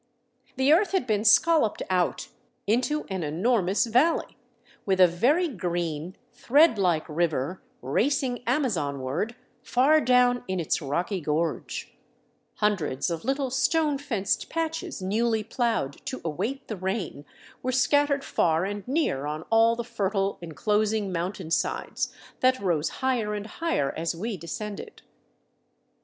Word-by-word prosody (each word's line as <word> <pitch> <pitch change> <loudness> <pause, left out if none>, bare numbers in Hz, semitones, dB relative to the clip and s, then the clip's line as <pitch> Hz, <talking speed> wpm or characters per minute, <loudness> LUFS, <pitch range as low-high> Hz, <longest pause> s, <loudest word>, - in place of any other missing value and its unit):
The 265 +3 +4
earth 390 +5 +3
had 380 -10 +1
been 215 -3 0
scolloped 295 +2 +4
out 180 -2 0 0.4
into 255 +8 +1
an 190 -1 -2
enormous 185 +6 +1
valley, 250 +9 +2 0.5
with 190 -2 0
a 185 - +9
very 255 - +2
green, 175 - -3 0.2
thread 285 -3 +4
like 175 -5 +1
river 165 0 -1 0.2
racing 245 - 0
Amazonward 165 - -1 0.3
far 290 +5 +3
down 250 -1 +3
in 185 -1 -2
its 165 +1 -1
rocky 170 +7 -2
gorge; 155 +2 -2 0.6
hundreds 180 -9 0
of 165 -1 -4
little 270 +1 -1
stone 295 +2 +1
fenced 225 -9 -1
patches 325 - -3
newly 220 +3 +1
plowed 225 - -2
to 260 - -4
await 245 - -3
the 215 - -5
rain, 190 -5 -3 0.4
were 255 - -1
scattered 280 +2 +2
far 165 -5 +1
and 205 +1 -5
near 255 - 0
on 155 +1 -4
all 225 +1 +5
the 235 - -3
fertile, 200 -4 -1
enclosing 210 +5 0
mountainsides 170 -1 -2 0.3
that 255 0 +3
rose 170 -6 0 0.2
higher 230 -5 0
and 205 0 -5
higher 220 - -1
as 165 +1 -2
we 215 +5 -3
descended. 200 - -7
210 Hz, 130 wpm, -26 LUFS, 170-255 Hz, 0.6 s, a